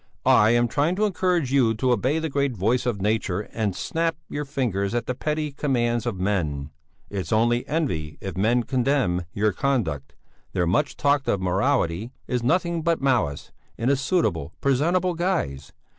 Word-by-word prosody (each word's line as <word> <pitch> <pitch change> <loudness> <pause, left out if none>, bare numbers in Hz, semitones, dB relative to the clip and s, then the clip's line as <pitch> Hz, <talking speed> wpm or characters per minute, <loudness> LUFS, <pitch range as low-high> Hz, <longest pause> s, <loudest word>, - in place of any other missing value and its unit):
"I 105 - +6
am 120 +1 +3
trying 150 +9 +1
to 210 +3 +2
encourage 180 -8 0
you 120 -5 +3
to 125 +3 +1
obey 130 +6 +1
the 160 0 -1
great 140 -4 -1
voice 120 +7 +1
of 100 -5 -1
nature 105 -3 0
and 105 -4 -1
snap 165 0 -1
your 145 0 -3
fingers 115 -8 -1
at 120 - -1
the 125 - -2
petty 150 +3 -2
commands 120 -4 0
of 100 -6 -3
men. 80 -7 -1 0.4
It's 100 0 -4
only 120 +2 +2
envy 90 - -2
if 95 -2 -6
men 115 +6 +2
condemn 125 -9 +1
your 105 +2 +1
conduct; 90 - -1 0.4
their 90 - +1
much 100 - 0
talked 145 -1 +2
of 100 - +1
morality 90 +2 0 0.2
is 125 -2 -1
nothing 170 +6 +1
but 165 +1 +1
malice, 120 - 0 0.3
in 120 +4 +1
a - - +4
suitable, 110 - 0
presentable 170 +7 +2
guise. 165 - -2
120 Hz, 170 wpm, -24 LUFS, 100-145 Hz, 0.4 s, I